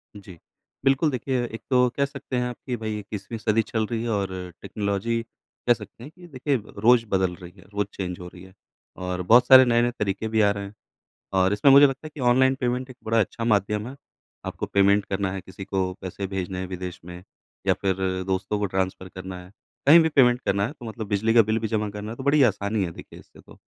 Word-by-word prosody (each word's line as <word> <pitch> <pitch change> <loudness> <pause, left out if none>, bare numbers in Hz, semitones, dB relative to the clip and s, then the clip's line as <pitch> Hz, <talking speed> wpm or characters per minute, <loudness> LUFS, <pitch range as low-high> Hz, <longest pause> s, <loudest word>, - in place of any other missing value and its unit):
जी। 95 -4 -12 0.5
बिल्कुल 135 +4 +3
देखिए, 130 -1 -1
एक 115 -1 -8
तो 125 -1 +4
कह 140 - +3
सकते 140 -2 -7
हैं 125 - 0
आप 120 - -7
कि 125 - -2
भई 110 -1 -4
21वीं 105 +2 -7
सदी 110 0 +1
चल 110 0 -2
रही 115 -1 -3
है 120 - -3
और 100 -3 -1 0.3
टेक्नोलॉज़ी 105 +3 -2 0.5
कह 120 - +7
सकते 120 - -12
हैं 145 - -10
कि 175 0 -14
देखिए 140 -1 -1 0.3
रोज़ 115 +1 +5
बदल 95 -2 +1
रही 90 0 -12
है - - -17
रोज़ 100 -1 -1
चेंज 90 -2 -5
हो 90 - -8
रही 90 0 -13
है 95 0 -15 0.5
और 90 0 -2
बहुत 115 +7 +5
सारे 130 -1 +9
नए-नए 120 0 +2
तरीके 100 +1 -1
भी 110 0 +1
आ 100 -1 +4
रहे 100 0 -4
हैं। 100 - -10 0.6
और 95 0 +3
इसमें 105 +7 +4
मुझे 140 +1 +9
लगता 135 +2 -5
है 155 - -8
कि 150 - -8
ऑनलाइन 130 +2 +4
पेमेंट 125 +1 -1
एक 125 - -11
बड़ा 115 +1 +2
अच्छा 110 +3 -2
माध्यम 105 -1 +1
है 135 - -10 0.5
आपको - - -4
पेमेंट 100 0 +3
करना 95 -1 -2
है 95 - -4
किसी 95 +1 -10
को 95 -2 -1
पैसे 95 +1 -5
भेजने 95 -1 -4
हैं 95 - -3
विदेश 90 -1 -6
में 90 0 -10 0.4
या - - +4
फ़िर 95 -2 -1 0.3
दोस्तों 95 +2 -1
को 105 - 0
ट्रांसफर 95 0 -2
करना 95 0 -8
है 90 - -16 0.4
कहीं 165 +4 +9
भी 160 - +3
पेमेंट 125 -5 +4
करना 100 +1 +1
है 130 - -6
तो 130 - -14
मतलब 110 0 -6
बिजली 110 +3 +1
का 115 - +8
बिल 110 +1 0
भी 110 -1 -3
जमा 105 -1 -1
करना 105 +1 -7
है 115 - -7
तो 135 - -7
बड़ी 140 +1 +4
आसानी 105 -3 +1
है 85 - -4
देखिए - - -12
इससे - - -17
तो। - - -18
105 Hz, 235 wpm, -24 LUFS, 95-125 Hz, 0.6 s, सारे